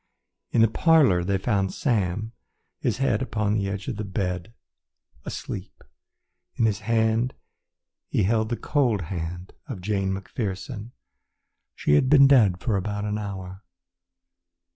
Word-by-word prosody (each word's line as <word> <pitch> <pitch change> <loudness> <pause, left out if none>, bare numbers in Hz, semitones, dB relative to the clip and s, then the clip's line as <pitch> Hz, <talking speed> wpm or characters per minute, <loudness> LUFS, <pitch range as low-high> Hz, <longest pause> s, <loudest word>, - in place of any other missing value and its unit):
In 115 - +3
the 115 - +7
parlour 135 - +4
they 100 +2 +1
found 95 -1 0
Sam, 110 - 0 0.5
his - - 0
head 130 -4 +1
upon 105 -5 0
the 100 -2 0
edge 100 +3 -5
of 125 -6 -3
the 110 - -3
bed, 95 0 -3 0.7
asleep. - - -7 0.7
In 115 - +2
his 105 -2 +1
hand 115 +2 +1 0.7
he - - +1
held 110 +2 +1
the 120 - -1
cold 125 -9 +1
hand 85 +2 -5
of 130 -9 -6
Jane 95 0 -1
McPherson. 105 +3 -4 0.9
She 75 - +1
had 130 - +4
been 140 -1 +8
dead 110 -10 +5
for 100 +1 0
an 105 +2 -3
hour. 95 -2 -6
105 Hz, 135 wpm, -25 LUFS, 95-115 Hz, 0.9 s, been